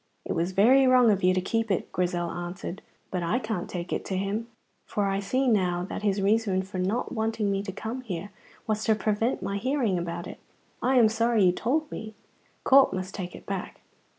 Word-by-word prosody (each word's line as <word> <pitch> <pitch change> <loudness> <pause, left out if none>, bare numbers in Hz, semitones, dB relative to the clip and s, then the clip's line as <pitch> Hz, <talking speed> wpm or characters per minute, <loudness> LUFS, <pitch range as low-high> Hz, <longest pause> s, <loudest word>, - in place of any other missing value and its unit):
"It - - -4
was 170 +3 -1
very 255 +8 +5
wrong 250 -3 +6
of 195 -1 +1
you 185 - +4
to 185 - +1
keep 225 +4 -1
it," 190 - -1
Grizel 175 -1 -1
answered, 175 +2 -6 0.3
"but 180 - -1
I 170 +8 +1
can't 220 -7 -3
take 175 -1 -4
it - - -2
to 190 - -2
him, 200 +4 -2 0.4
for 205 - -1
I 195 0 0
see 255 +7 0
now 180 -6 +2
that - - -5
his 200 -1 0
reason 200 -2 +2
for 190 -1 -6 0.3
wanting 220 -3 -1
me 195 - 0
not 200 - -5
to - - -2
come 225 +6 -5
here 200 -4 -5 0.3
was 215 0 -1
to 220 - +4
prevent 215 +3 0
my 200 - -2
hearing 240 -5 0
about 170 0 -4
it. - - -9 0.4
I 260 +1 +2
am 235 -3 +7
sorry 225 0 +2
you 180 - +6
told 295 - -1
me. 220 -1 -7 0.5
Corp 270 0 +6
must 185 0 -4
take 180 -3 -6
it - - -12
back." 195 -2 -5
205 Hz, 210 wpm, -27 LUFS, 185-225 Hz, 0.5 s, am